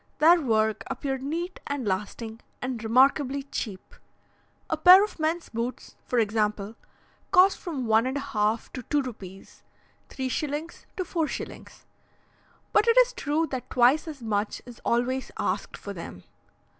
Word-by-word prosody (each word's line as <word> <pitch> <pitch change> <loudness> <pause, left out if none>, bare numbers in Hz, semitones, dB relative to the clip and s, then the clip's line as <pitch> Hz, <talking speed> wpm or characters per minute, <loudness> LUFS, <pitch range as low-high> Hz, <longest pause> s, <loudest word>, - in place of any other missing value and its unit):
Their 335 +3 +6
work 220 -4 +1
appeared 270 0 -3
neat 335 +6 -4
and 280 -5 -3
lasting, 210 +4 -3 0.2
and 250 -3 -4
remarkably 270 +4 +3
cheap. 220 -8 -6 0.7
A - - 0
pair 360 +5 +8
of 420 - -5
men's 325 +2 -1
boots, 235 +2 -5
for 250 - -1
example, 215 -1 0 0.5
cost 375 +2 +5
from 290 -8 -4
one 220 +2 +3
and 265 +2 -2
a - - -2
half 220 -5 -1
to 255 - -5
two 290 +4 0
rupees 195 -6 -10 0.5
(3s. 290 +4 -4
to 370 - 0
4s.); 330 -3 -5 0.9
but 430 +2 +4
it 465 +1 +4
is - - +6
true 310 -5 0
that 260 -2 -5
twice 255 +6 +4
as 290 -6 -8
much 210 -1 -1
is 245 -2 -12
always 250 +2 0
asked - - -2
for - - -7
them. - - -9
260 Hz, 145 wpm, -26 LUFS, 225-310 Hz, 0.9 s, pair